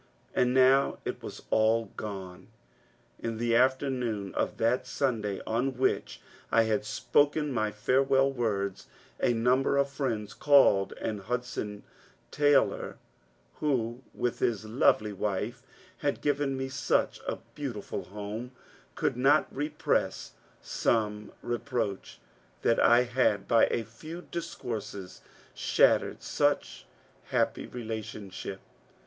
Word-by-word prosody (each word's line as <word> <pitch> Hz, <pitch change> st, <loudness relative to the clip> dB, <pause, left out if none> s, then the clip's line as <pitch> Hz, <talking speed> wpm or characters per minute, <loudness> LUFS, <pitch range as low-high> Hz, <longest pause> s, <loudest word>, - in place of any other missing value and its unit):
And 125 Hz, 0 st, +2 dB
now 130 Hz, +1 st, +4 dB
it -, -, -4 dB
was -, -, -8 dB
all 110 Hz, -1 st, +3 dB
gone 95 Hz, -4 st, -7 dB, 0.8 s
I -, -, -1 dB
In 115 Hz, -1 st, -3 dB
the 115 Hz, 0 st, +1 dB
afternoon 125 Hz, -5 st, +1 dB
of -, -, -1 dB
that 125 Hz, +3 st, +1 dB
Sunday 110 Hz, -8 st, -1 dB
on 125 Hz, +3 st, -1 dB
which 130 Hz, -, 0 dB, 0.3 s
I 115 Hz, -, +5 dB
had 110 Hz, -1 st, 0 dB
spoken 145 Hz, +7 st, +2 dB
my 110 Hz, -4 st, 0 dB
farewell 135 Hz, +5 st, +2 dB
words, 100 Hz, -6 st, -2 dB, 0.3 s
a 120 Hz, -, +3 dB
number 125 Hz, +4 st, +2 dB
of 140 Hz, 0 st, +2 dB
friends 115 Hz, -7 st, -2 dB
called, 135 Hz, -9 st, +5 dB
and 105 Hz, -3 st, -3 dB
Hudson 115 Hz, -2 st, -4 dB, 0.5 s
Taylor 145 Hz, -1 st, +2 dB, 0.3 s
— -, -, -37 dB
who, 120 Hz, -4 st, 0 dB
with 120 Hz, -, -1 dB
his 110 Hz, -2 st, 0 dB
lovely 110 Hz, -2 st, +2 dB
wife, 105 Hz, +5 st, -2 dB, 0.4 s
had -, -, -1 dB
given 145 Hz, -2 st, 0 dB
me 130 Hz, 0 st, -2 dB
such 135 Hz, +1 st, 0 dB
a -, -, -1 dB, 0.2 s
beautiful 130 Hz, -8 st, -5 dB
home 105 Hz, +5 st, -6 dB, 0.2 s
— -, -, -28 dB
could -, -, 0 dB
not 140 Hz, +5 st, +3 dB
repress 145 Hz, +3 st, -1 dB, 0.3 s
some 105 Hz, -2 st, 0 dB
re 120 Hz, -1 st, -1 dB
proach 120 Hz, -8 st, -3 dB, 0.5 s
that 115 Hz, -, +3 dB
I 120 Hz, +1 st, +6 dB
had 125 Hz, -5 st, +1 dB
by 115 Hz, -1 st, +5 dB
a 115 Hz, -, -1 dB
few 155 Hz, +10 st, -9 dB
discourses 115 Hz, -, -5 dB, 0.3 s
shattered -, -, +2 dB
such -, -, 0 dB, 0.4 s
happy -, -, 0 dB
relationship. 110 Hz, -5 st, -6 dB
120 Hz, 125 wpm, -29 LUFS, 105-130 Hz, 0.8 s, I